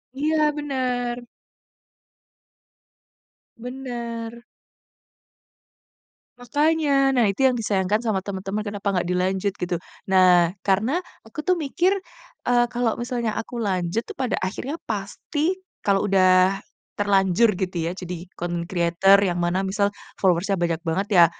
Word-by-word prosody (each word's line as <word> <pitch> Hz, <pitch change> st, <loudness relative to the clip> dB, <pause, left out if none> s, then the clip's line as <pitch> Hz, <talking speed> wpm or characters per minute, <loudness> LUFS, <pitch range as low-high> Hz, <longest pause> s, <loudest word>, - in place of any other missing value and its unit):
Iya 310 Hz, +3 st, +1 dB, 0.2 s
benar. 250 Hz, -4 st, -2 dB, 2.4 s
Benar. 235 Hz, -2 st, -6 dB, 1.9 s
Makanya. 290 Hz, +1 st, +2 dB
Nah, 235 Hz, -, +5 dB
itu 200 Hz, +4 st, -1 dB
yang 250 Hz, -, -1 dB
disayangkan 205 Hz, -2 st, +1 dB
sama 205 Hz, -4 st, +1 dB
teman-teman 195 Hz, +1 st, -4 dB
kenapa 205 Hz, -1 st, -5 dB
enggak 180 Hz, -2 st, 0 dB
dilanjut 190 Hz, +2 st, 0 dB
gitu. 180 Hz, 0 st, -2 dB, 0.3 s
Nah, 180 Hz, -2 st, +5 dB
karena 220 Hz, -, +1 dB, 0.2 s
aku 225 Hz, +7 st, -6 dB
tuh 365 Hz, +3 st, +1 dB
mikir, 350 Hz, +6 st, +1 dB, 0.5 s
eee, 245 Hz, 0 st, +4 dB
kalau 240 Hz, -2 st, 0 dB
misalnya 240 Hz, -2 st, -2 dB
aku 240 Hz, +3 st, -5 dB
lanjut 195 Hz, 0 st, -1 dB
itu, -, -, -8 dB
pada 260 Hz, -3 st, -2 dB
akhirnya 250 Hz, -, -4 dB
pasti 295 Hz, -, -2 dB, 0.2 s
kalau 195 Hz, 0 st, +2 dB
udah 185 Hz, 0 st, +4 dB, 0.4 s
terlanjur 200 Hz, +2 st, +3 dB
gitu 185 Hz, -1 st, -2 dB
ya 170 Hz, -, -1 dB
jadi 180 Hz, -2 st, -7 dB
content 175 Hz, 0 st, -3 dB
creator 180 Hz, +3 st, +4 dB
yang 180 Hz, -3 st, 0 dB
mana 175 Hz, +2 st, 0 dB
misal 200 Hz, +1 st, 0 dB, 0.2 s
followers-nya 190 Hz, +1 st, +2 dB
banyak 170 Hz, -2 st, -1 dB
banget, 180 Hz, +4 st, -1 dB
ya 175 Hz, -2 st, +8 dB
205 Hz, 120 wpm, -23 LUFS, 185-245 Hz, 2.4 s, ya